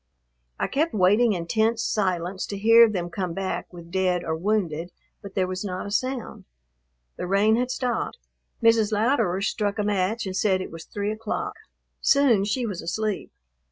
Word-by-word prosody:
I - - +1
kept 305 0 0
waiting 210 +4 +4
in 170 -3 -3
tense 225 +5 +1
silence 185 -2 -1
to 200 - -5
hear 230 +3 +7
them 175 -4 -3
come 180 -3 -3
back 195 -1 -3
with 170 -1 -12
dead 185 -1 +1
or 160 - -2
wounded, 175 -3 -1 0.3
but 200 -1 -10
there 190 -2 +2
was 185 +1 -4
not 185 -2 -4
a 200 - -6
sound. 255 +3 -3 0.7
The - - -4
rain 200 +3 +3
had 250 +2 0
stopped. 250 - -2 0.5
Mrs. 225 -2 +4
Louderer 215 -4 +1
struck 205 0 -1
a 210 - 0
match 205 +2 0
and 190 -1 -4
said 195 -1 +2
it 185 - -6
was 165 0 -9
three 205 0 -3
o'clock. 225 - -3 0.5
Soon 255 -8 +4
she 240 +4 -1
was 200 -6 -4
asleep. 210 +4 -3
205 Hz, 175 wpm, -25 LUFS, 185-225 Hz, 0.7 s, hear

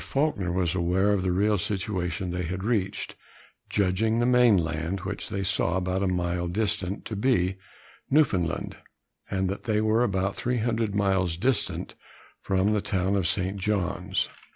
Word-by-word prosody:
Faulkner 135 - 0
was 90 -2 0
aware 95 +3 +2
of 100 -2 +2
the 90 0 0
real 100 +2 +2
situation 95 -3 -2
they 90 +1 -2
had 90 +2 -3
reached, 100 -3 -1 0.5
judging 105 +3 +1
the 120 - +2
main 125 -4 +5
land, 85 +2 -2
which - - -5
they 100 0 -2
saw 90 -1 +1
about 95 +1 -1
a 100 - +1
mile 90 -1 -1
distant, 100 0 -2
to 110 - -4
be 100 -5 +1 0.5
Newfoundland, 95 - +1 0.5
and 95 -1 0
that 100 +5 -4
they 110 -2 +1
were 110 +2 +3
about 95 -3 0
300 115 -3 -1
miles 95 -4 +1
distant 125 +5 0 0.5
from 95 +2 +1
the 105 - +1
town 95 -4 0
of 95 -3 +1
St. 95 +1 -1
John's. 95 -1 -1
95 Hz, 155 wpm, -27 LUFS, 90-105 Hz, 0.5 s, main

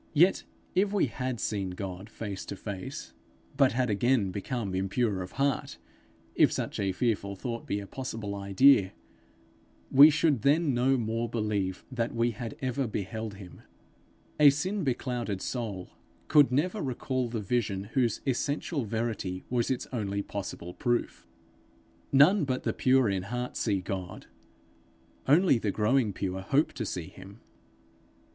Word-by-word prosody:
Yet, 175 +6 +4 0.3
if 195 +2 +2
we 205 -5 +2
had 125 -1 -4
seen 100 -3 -2
God 95 +2 -6
face 100 -4 -6
to - - -5
face, 95 -2 -7 0.4
but 135 -3 +4
had 125 -2 +1
again 105 -1 +2
become 100 +1 -3
impure 95 +2 0
of 90 - -7
heart 140 -1 -1 0.6
if - - +4
such - - -3
a 100 -1 +1
fearful 100 -1 -1
thought 115 +3 -5
be 100 - -1
a 100 - -7
possible 115 -3 -5
idea 100 +1 +4 1.0
we 140 +3 +10
should 150 -5 +2
then 145 +2 +3
no 130 +2 +3
more 115 0 -2
believe 105 -5 -2
that 120 -2 -2
we 115 +1 +2
had 115 0 -7
ever 130 0 -1
beheld 110 +1 -4
him. 95 -3 -12 0.8
A 150 -1 +9
sin 185 +8 -1
beclouded 120 -6 -2
soul 105 -4 -4 0.4
could 145 -4 +6
never 175 +11 0
recall 130 -2 -2
the 115 -1 -3
vision 105 -2 -1
whose 120 -5 +1
essential 140 +1 -1
verity 110 -4 -3
was 120 -2 +1
its 130 - -1
only 100 -4 -2
possible 95 -4 -6
proof. 120 +4 -2 0.8
None 150 +8 +6
but 130 -2 -2
the - - 0
pure 130 -1 +3
in 95 -2 0
heart 125 +6 -4
see 100 -4 0
God; 90 -1 -6 1.0
only 150 -2 +5
the 110 - -1
growing 110 +3 +2
pure 95 0 -3
hope 140 +10 +1
to 115 -5 -4
see 90 -4 -5
him. 100 +4 -13
115 Hz, 150 wpm, -29 LUFS, 100-130 Hz, 1.0 s, we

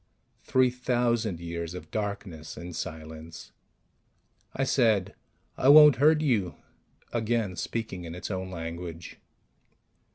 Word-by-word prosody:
Three 130 -1 +2
thousand 120 -6 0
years 85 0 -5
of 90 - -9
darkness 100 -7 -5
and 85 -1 -7
silence... 80 +1 -8 1.0
I 135 - 0
said, 110 -8 +2 0.5
"I 130 - +4
won't 150 -3 +9
hurt 150 +3 +4
you," 110 - +1 0.6
again 115 -4 0
speaking 95 +1 -4
in 85 0 -7
its 90 - -6
own 95 -1 -4
language. 85 -1 -7
100 Hz, 110 wpm, -28 LUFS, 85-120 Hz, 1.0 s, won't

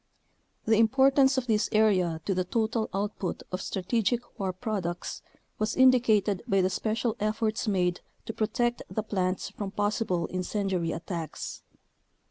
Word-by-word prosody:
The 220 0 +4
importance 265 +3 +4
of 260 - 0
this 215 -3 +1
area 185 -7 +3
to 195 - +1
the 185 0 0
total 220 +3 -1
output 195 -2 -3
of 185 0 -3
strategic 230 +5 -1
war 190 -2 0
products 185 -4 -4 0.4
was 215 +1 0
indicated 230 -7 +4
by 195 -4 +3
the 185 +1 +1
special 220 +3 -1
efforts 215 +1 -1
made 180 -3 +1 0.2
to 225 - -4
protect 240 +3 0
the 215 - -2
plants 185 -3 -1
from 200 -2 -5
possible 205 -3 0
incendiary 185 -2 -1
attacks. 165 -1 -5
210 Hz, 135 wpm, -28 LUFS, 185-225 Hz, 0.4 s, The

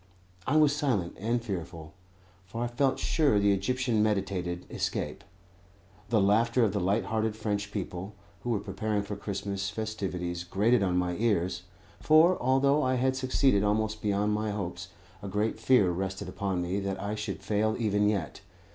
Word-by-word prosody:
I 145 - +1
was 150 -2 +5
silent 120 - -1
and 115 +3 -1
fearful, 85 -6 -6 0.5
for 115 +5 -4
I - - 0
felt 130 +3 +1
sure 145 -9 +2
the 100 0 +4
Egyptian 115 +3 0
meditated 95 -4 -1
escape. - - -3 0.9
The 115 -2 +3
laughter 115 +5 +3
of 105 -4 +1
the 100 - 0
light 100 +4 +1
hearted 110 -1 -1
French 105 -2 -3
people, 95 0 -5 0.3
who 120 - -4
were 115 -4 +1
preparing 105 +1 -2
for 100 +1 -5
Christmas 100 -1 -3
festivities, 95 -5 -4
grated 105 +6 +2
on 90 -2 +1
my 90 -1 0
ears; 95 -5 0 0.3
for, 160 +4 +5
although 135 +3 +3
I 130 -2 +1
had 130 +1 +1
succeeded 130 -4 +2
almost 110 +1 0
beyond 105 0 +1
my 105 0 -1
hopes, 90 -3 -4 0.3
a 100 - -6
great 105 +3 -1
fear 110 -6 +4
rested 95 +2 -3
upon 95 -3 -2
me 90 +3 -1
that 95 -1 -3
I 100 +2 -3
should 105 -2 -5
fail 110 +1 +1
even 105 -2 +2
yet. 90 -10 -3
105 Hz, 165 wpm, -29 LUFS, 95-115 Hz, 0.9 s, was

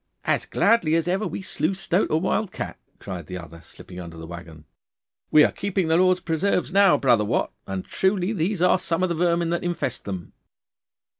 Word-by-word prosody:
'As - - +1
gladly 170 -9 +3
as 165 0 0
ever 190 +4 0
we - - -6
slew 190 - -1
stoat 190 0 0
or 155 - +2
wild 190 +3 -1
cat,' - - -6 0.2
cried 90 -6 -7
the 90 - -5
other, 85 -1 -11
slipping 90 +1 -12
under 85 -2 -9
the 80 - -8
waggon. 85 -2 -10 0.6
'We 150 - +7
are - - +3
keeping 195 -4 -2
the 160 - +4
Lord's 185 0 +3
preserves 175 +3 0
now, 195 -6 +6
brother 120 -6 +3
Wat, 105 - 0 0.2
and 95 -1 -4
truly 190 +1 0
these 180 0 -1
are 180 - +4
some 170 0 -1
of 185 - +1
the - - 0
vermin 170 0 +1
that 170 - -1
infest 175 -1 -3
them. 95 -3 -6
170 Hz, 200 wpm, -24 LUFS, -, 0.6 s, We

